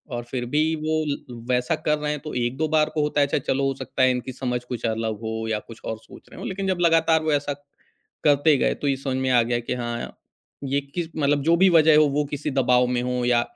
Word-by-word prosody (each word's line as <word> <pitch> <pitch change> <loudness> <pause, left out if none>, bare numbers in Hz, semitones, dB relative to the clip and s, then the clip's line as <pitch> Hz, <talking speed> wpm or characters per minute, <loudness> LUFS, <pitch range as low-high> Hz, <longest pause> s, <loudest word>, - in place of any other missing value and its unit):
और 120 - -4
फ़िर 120 0 -4
भी 150 +5 +1
वो 155 0 -1
ल 135 -4 -5
वैसा 125 0 +1
कर 150 - +3
रहे 150 0 -2
हैं 150 - -3
तो 155 - -6
1-2 125 +6 -1
बार 155 0 +3
को 150 - +1
होता 150 0 +1
है 140 - +3
अच्छा 140 - 0
चलो 135 +1 -1
हो 135 - 0
सकता 130 - -2
है 130 - +5
इनकी 125 +1 -3
समझ 125 -1 -3
कुछ 125 -2 -5
अलग 110 -1 -2
हो 110 0 -4
या 105 -1 0
कुछ 115 +1 -13
और 110 - -3
सोच 110 - -16
रहे - - -12
हों - - -5
लेक़िन 195 0 -3
जब 185 -2 0
लगातार 165 -1 +3
वो 155 - 0
ऐसा 145 0 0 0.7
करते 145 +1 +4
गए - - +1
तो 145 - -4
ये 135 - +2
समझ 135 -1 -3
में 130 0 0
आ 120 - +5
गया 120 +1 -1
कि 120 +1 -4
हाँ, 120 -1 -5 0.5
ये 140 +1 0
किस 160 +5 -5
मतलब 145 -1 +2
जो 165 +2 +4
भी 190 +1 +5
वज़ह 160 -3 +6
हो 155 - +6
वो 145 +2 0
किसी 145 0 -3
दबाव 125 -2 +3
में 125 -1 0
हो 125 0 -1
या 120 -1 +3
135 Hz, 260 wpm, -24 LUFS, 125-150 Hz, 0.7 s, वज़ह